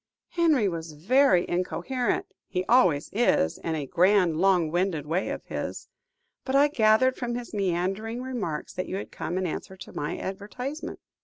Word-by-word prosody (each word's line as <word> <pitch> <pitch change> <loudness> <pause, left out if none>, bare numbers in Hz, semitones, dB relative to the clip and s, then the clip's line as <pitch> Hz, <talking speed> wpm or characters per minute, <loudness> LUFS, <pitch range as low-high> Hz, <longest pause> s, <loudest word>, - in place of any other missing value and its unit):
Henry 315 - +3
was 165 -3 -4
very 195 - +3
incoherent; 240 +8 -1 0.2
he 185 -1 -2
always 180 - +3
is, 200 - +2
in 165 -1 -2
a 150 -3 -3
grand, 180 +1 +3
long 180 -3 +3
winded 175 -4 0
way 170 +5 -1
of - - -4
his - - -5
own. 475 0 -52
But 265 - -2
I 285 +1 +6
gathered 240 0 +3
from 240 -1 -3
his 245 -1 -6
meandering 195 +4 -1
remarks, 220 -13 -4
that 185 - -4
you - - -4
had 200 - -5
come 175 - -4
in 185 - -1
answer 190 +3 -5
to - - -11
my 145 - -3
advertisement." 245 +10 -6
195 Hz, 170 wpm, -27 LUFS, 175-245 Hz, 0.2 s, I